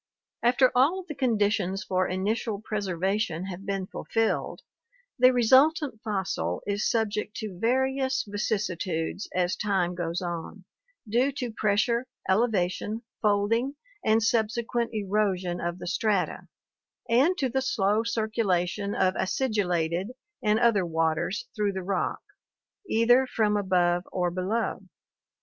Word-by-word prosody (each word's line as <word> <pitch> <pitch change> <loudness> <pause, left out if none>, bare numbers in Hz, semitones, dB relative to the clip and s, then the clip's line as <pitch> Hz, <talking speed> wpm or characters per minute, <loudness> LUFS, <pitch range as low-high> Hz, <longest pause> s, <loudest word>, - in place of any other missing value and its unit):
— - - -39
After 255 0 +4
all 280 +9 +3
of 365 - -17
the 305 - -5
conditions 205 -7 0
for 185 0 0
initial 205 +3 -1
preservation 195 -3 -2
have 195 +1 -7
been 195 -1 -1
fulfilled, 225 +3 -2 0.6
the 255 +1 +7
resultant 260 - +4
fossil 190 - -2
is 205 +1 0
subject 215 -2 -1
to 200 -5 -6
various 265 +3 +1
vicissitudes 190 -4 -2
as 180 0 +1
time 190 -4 0
goes 175 -1 -2
on, 175 +2 -6 0.4
due 245 +6 +2
to 250 -4 -4
pressure, 225 +3 +1 0.2
elevation, 205 +1 0 0.2
fold 205 0 +2
ing, 260 +5 0 0.3
and 220 +1 +3
subsequent 230 +1 0
erosion 195 -4 -1
of 170 +1 -2
the - - -8
strata, 195 +1 0 0.6
and 275 +11 +3
to 270 - +1
the 265 +2 -1
slow 215 -4 +1
circula 220 -5 0
tion 200 +2 -4
of 185 - +2
acidulated 185 -6 0 0.3
and 215 -2 +2
other 230 -5 +3
waters 165 +3 -1
through 205 -2 0
the 190 -1 -4
rock, 195 +1 -1 0.7
either 245 +4 +4
from 215 -4 +1
above 180 -3 +2
or 180 -1 0
below. 190 +6 -1
210 Hz, 130 wpm, -27 LUFS, 185-235 Hz, 0.7 s, the